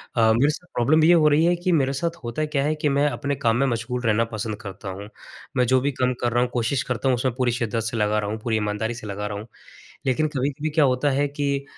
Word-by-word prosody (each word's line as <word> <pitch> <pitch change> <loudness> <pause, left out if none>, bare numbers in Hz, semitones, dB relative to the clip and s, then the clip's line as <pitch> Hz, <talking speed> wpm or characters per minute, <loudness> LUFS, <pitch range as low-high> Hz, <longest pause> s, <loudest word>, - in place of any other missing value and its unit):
अ, 110 -1 +4
मेरे 135 +6 +3
साथ 175 +3 -5
प्रॉब्लम 155 +6 +3
ये 175 +2 +6
हो 155 -3 +5
रही 155 +3 +3
है 175 0 +3
कि 180 +1 -1
मेरे 140 -4 +2
साथ 170 +4 -2
होता 120 +7 -2
क्या 145 -2 -1
है 155 +1 0
कि 150 - +2
मैं 140 +1 +2
अपने 140 0 -2
काम 115 -2 +1
में 135 - +2
मशगूल 120 +1 -2
रहना 115 +1 +3
पसंद 110 0 -3
करता 95 -1 -7
हूँ। 100 +2 -7 0.5
मैं 125 - +4
जो 130 +1 +4
भी 140 +2 0
काम 125 0 0
कर 120 - +1
रहा 120 - +3
हूँ, 125 - -2
कोशिश 120 +2 0
करता 125 +2 -1
हूँ 125 - +3
उसमें 125 +1 -1
पूरी 125 -2 +1
शिद्दत 115 -1 -1
से 115 +1 -3
लगा 105 0 +1
रहा 105 -1 -3
हूँ, 110 +1 -4
पूरी 110 -2 0
ईमानदारी 105 +2 -2
से 110 -2 -8
लगा 105 +1 -4
रहा 105 -1 -5
हूँ। 110 - -9 0.6
लेकिन 150 +4 +1
कभी-कभी 145 +4 -1
क्या 150 -1 +3
होता 130 +2 +2
है 140 +1 +1
कि 140 -1 -2
125 Hz, 270 wpm, -23 LUFS, 115-145 Hz, 0.6 s, ये